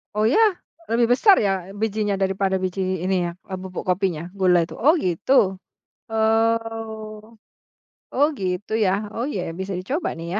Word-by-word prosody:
Oh 215 - +1
ya? 245 - +3 0.5
Lebih 235 +1 +2
besar 380 - +6
ya 195 -1 -1
bijinya 210 -1 -1
daripada 190 0 0
biji 185 -1 -2
ini 185 -1 +1
ya, - - -4 0.3
bubuk 185 -1 -6
kopinya 180 -3 -1
gula 180 -3 +4
tuh? - - -9
Oh 290 +7 +5
gitu. 190 - +2 0.5
Oh, 225 -1 -1 0.7
oh 285 +3 +3
gitu 185 -1 -3
ya. 210 -1 +1
Oh 235 +4 -2
ya 175 - -4
bisa 190 +1 -4
dicoba 260 - -3
nih 165 - -6
200 Hz, 145 wpm, -23 LUFS, 185-225 Hz, 0.7 s, besar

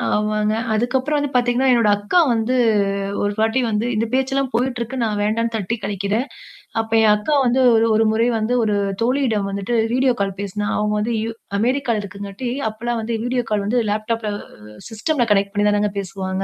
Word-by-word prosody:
ஆமாங்க. 215 0 0 0.2
அதுக்கப்புறம் 260 +6 0
வந்து 290 -1 -1
பார்த்தீங்கன்னா, 245 +2 +2
என்னோட 230 -3 +4
அக்கா 205 - +1
வந்து 230 +2 0 0.7
ஒரு 205 0 0
வாட்டி 225 +4 +2
வந்து 215 +2 0
இந்த 220 +2 0
பேச்சல்லாம் 265 0 0
போயிட்டுருக்கு. 245 0 -2
நான் 210 -2 -1
வேண்டான்னு 230 +2 0
தட்டி 215 +2 -2
கழிக்கிறேன். 200 +6 -1 0.5
அப்ப 225 0 -3
என் 210 -1 +6
அக்கா 210 +9 -1
வந்து 245 +2 +2 0.2
ஒரு 225 0 +4
ஒரு 225 - +4
முறை 225 +2 +2
வந்து 220 +3 -1
ஒரு 210 -1 +1 0.3
தோழியிடம் 235 -5 +1
வந்துட்டு 200 +4 -2 0.2
வீடியோ 255 0 +3
கால் 195 -1 -1
பேசினா. 200 +1 -3
அவங்க 210 0 0
வந்து 230 +3 -1
யூ 225 - -3 0.3
அமெரிக்கால 235 -1 0
இருக்குங்காட்டி 200 +5 -6 0.2
அப்பலாம் 235 +2 -3
வந்து 230 +1 -2
வீடியோ 245 0 0
கால் 210 -1 0
வந்து 240 +4 +1
லேப்டாப்ல 215 +1 -2 0.6
சிஸ்டம்ல 240 +4 0
கனெக்ட் 200 0 +2
பண்ணி 205 0 +1
தானங்க 205 0 +1
பேசுவாங்க. 190 0 -4
220 Hz, 170 wpm, -20 LUFS, 205-245 Hz, 0.7 s, என்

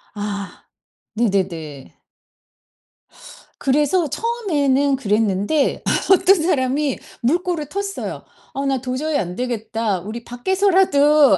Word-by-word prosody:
아 200 -3 -5 0.5
네네네. 180 - -2 1.6
그래서 300 +5 +2
처음에는 290 - +1
그랬는데 210 +4 +1 0.3
어떤 380 -1 +5
사람이 285 -4 0 0.2
물꼬를 335 +4 0
텄어요. 400 +5 -4 0.3
"어 275 +1 -3
나 270 -2 0
도저히 280 +4 -1
안 180 -5 -3
되겠다. 225 -4 -2
우리 215 +6 -7
밖에서라도 300 - +3
270 Hz, 220 characters per minute, -20 LUFS, 215-315 Hz, 1.6 s, 어떤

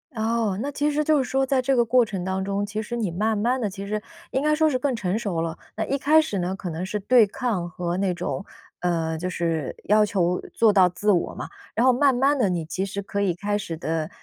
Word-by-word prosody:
哦， 220 -3 0
那 285 +3 -2
其 290 +1 0
实 300 +1 0
就 310 0 +3
是 270 - +2
说 270 0 +2
在 265 -1 +1
这 270 +1 +1
个 240 - +4
过 245 +1 +4
程 195 -4 -4
当 190 +1 -2
中， 200 +1 -1
其 210 +1 -4
实 230 +2 -5
你 220 -7 -1
慢 215 +5 0
慢 240 +5 +1
地 220 -4 -1
其 195 +1 -7
实 210 +1 -2 0.3
应 265 - 0
该 305 +1 +2
说 315 0 +3
是 255 -4 0
更 265 -1 0
成 205 -1 -1
熟 185 -7 -2
了。 165 0 -3 0.2
那 220 - -2
一 275 - -1
开 305 +3 +5
始 210 -11 -3
呢， 180 +2 -1
可 195 -2 -6
能 165 +2 -4
是 210 +3 -3
对 225 +2 +5
抗 200 -6 -2
和 175 +1 -3
那 190 -1 +1
种 180 +2 -4 0.3
呃， 165 -2 -1
就 180 +3 -3
是 165 -5 -2
要 210 +1 +4
求 180 -4 0
做 225 -2 +4
到 190 -3 +5
自 205 +4 0
我 175 -4 0
嘛。 - - -6 0.3
然 235 - +3
后 260 - +7
慢 265 +1 +3
慢 275 +3 +2
地， 215 -6 +3
你 175 -3 -2
其 190 +4 -2
实 200 +1 -4
可 200 +1 -4
以 195 -3 +2
开 205 +3 -1
始 180 -5 -5
地， 160 0 -2
205 Hz, 280 characters per minute, -24 LUFS, 180-250 Hz, 0.3 s, 后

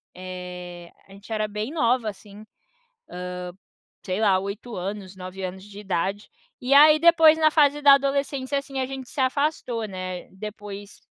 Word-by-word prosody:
eh, 180 -1 -8 0.2
a 195 - -16
gente 200 +3 -14
era 215 0 0
bem 210 +5 -4
nova 245 -7 +1
assim, 205 +1 -12
hã, - - -14 1.6
sei 185 +2 -2
lá, 195 -3 +4
8 205 +4 -6
anos, 190 +1 -5
9 185 +1 -8
anos 185 +1 -5
de 205 0 -12
idade. 195 +1 -2 0.3
E 255 +2 +1
aí 305 +2 +8
depois 325 -1 +6
na 310 -1 +4
fase 295 -1 +3
da 280 -1 +8
adolescência, 275 0 0
assim, 275 -1 -6
a - - 0
gente 265 -1 -7
se 275 - -3
afastou, 260 -4 -1
né, 185 -2 -6
depois 205 0 -9
215 Hz, 160 wpm, -24 LUFS, 190-275 Hz, 1.6 s, aí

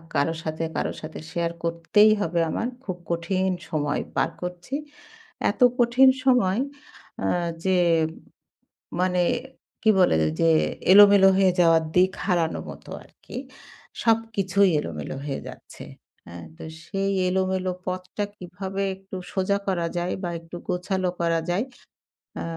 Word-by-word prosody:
কারো 165 +3 +2
সাথে, 155 +1 -3
কারো - - -1
সাথে 155 0 -7
শেয়ার 170 -1 -1
করতেই 170 +6 +4
হবে 170 -2 0
আমার। 225 - -1 0.2
খুব 185 -6 -5
কঠিন 185 +3 0 0.2
সময় 150 -2 -1
পার - - +2
করছি। 180 +8 -5 0.8
এত - - -16 0.2
কঠিন 245 +2 +6 0.2
সময় 240 -5 +3 0.6
অ্যা - - 0 0.3
যে 190 -1 +3 1.2
মানে 180 0 +2 0.6
কি 220 - +3
বলে 180 - +4 0.3
যে 165 - +4 0.4
এলোমেলো 200 -1 +8
হয়ে 190 -1 +4
যাওয়া 165 -1 +6 0.2
দিক 185 +1 +5
হারানোর 170 -4 0
মতো - - -13
আরকি। - - -12 0.7
সবকিছুই 205 -4 +2
এলোমেলো 80 - -5
হয়ে 140 -2 -3
যাচ্ছে। - - -12 0.4
হ্যাঁ? 85 0 -9
তো - - -10 0.2
সেই 195 +2 -2 0.2
এলোমেলো 185 0 0 0.2
পথটা 185 +2 -3
কিভাবে 190 +2 -5
একটু 190 0 -11 0.2
সোজা 195 +1 +1
করা 175 -3 0
যায় 175 +1 -1
বা 175 - -1
একটু 165 +1 -12
গোছালো 185 0 -1
করা 165 -1 +2
যায়, 185 +6 +1 0.8
আ - - -3
185 Hz, 130 wpm, -24 LUFS, 170-195 Hz, 1.2 s, এলোমেলো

